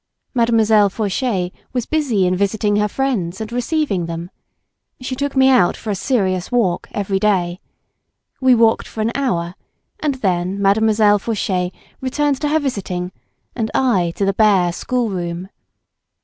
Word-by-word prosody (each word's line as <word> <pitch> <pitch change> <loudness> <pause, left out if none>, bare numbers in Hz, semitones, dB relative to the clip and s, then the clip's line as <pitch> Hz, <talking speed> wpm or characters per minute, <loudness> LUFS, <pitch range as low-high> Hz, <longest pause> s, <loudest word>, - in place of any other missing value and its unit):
Mademoiselle 225 -4 +4
Fauchet 195 -2 -1 0.2
was 245 -2 -1
busy 265 -12 +1
in 180 0 +1
visiting 205 +2 +1
her 210 0 +2
friends 210 -8 -2
and 220 0 -5
receiving 245 - -1
them. 170 +2 -6 0.7
She 255 0 -4
took 280 +1 -3
me 265 0 +5
out 250 -10 +4
for 220 - -4
a - - -1
serious 190 -3 -1
walk 210 -8 +1
every 195 -1 -1
day. 185 -4 +1 0.8
We 260 -1 +5
walked 225 -1 +3
for 220 - -5
an 220 +2 0
hour, 180 -11 -1 0.5
and 295 -3 -1
then 185 -4 -1
Mademoiselle 210 +1 +3
Fauchet 190 -4 -1 0.3
returned 280 +1 0
to 295 - 0
her 310 - +3
visiting 190 -11 -3 0.4
and 225 -3 -2
I 200 -10 +2
to 200 - 0
the 195 - +1
bare 195 -4 +3
schoolroom. 185 -5 -3
210 Hz, 150 wpm, -19 LUFS, 185-250 Hz, 0.8 s, me